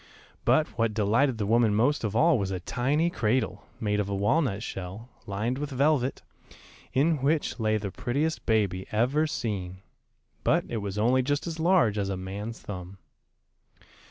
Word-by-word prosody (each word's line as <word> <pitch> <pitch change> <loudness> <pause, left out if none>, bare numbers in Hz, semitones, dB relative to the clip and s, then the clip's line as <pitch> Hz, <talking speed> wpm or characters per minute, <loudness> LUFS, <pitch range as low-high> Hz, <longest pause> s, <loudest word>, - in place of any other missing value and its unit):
But 155 - +4
what 115 -2 +1
delighted 115 +5 +2
the 105 - -1
woman 115 0 +3
most 125 +7 +2
of 110 -1 -2
all 155 +1 +4
was 100 -1 -1
a 95 -1 -3
tiny 145 - 0
cradle, 125 -4 -1
made 105 -3 0
of 100 -1 -1
a 100 - -1
walnut 105 +1 +1
shell, 95 +4 -7 0.2
lined 110 +6 -2
with 145 0 -3
velvet, 140 -1 +1 0.7
in 150 +2 +2
which 145 -2 0
lay 110 -1 +2
the 100 -2 -4
prettiest 145 +10 -1
baby 100 -5 +1
ever 130 +8 +2
seen, 95 - -4 0.6
but - - +2
it 115 - -3
was 100 -1 -4
only 125 +5 +3
just 145 +3 -1
as 165 -1 -5
large 160 - +3
as 100 -1 -1
a 95 - -2
man's 100 +5 -6
thumb. 95 -1 -7
115 Hz, 165 wpm, -27 LUFS, 100-140 Hz, 0.7 s, But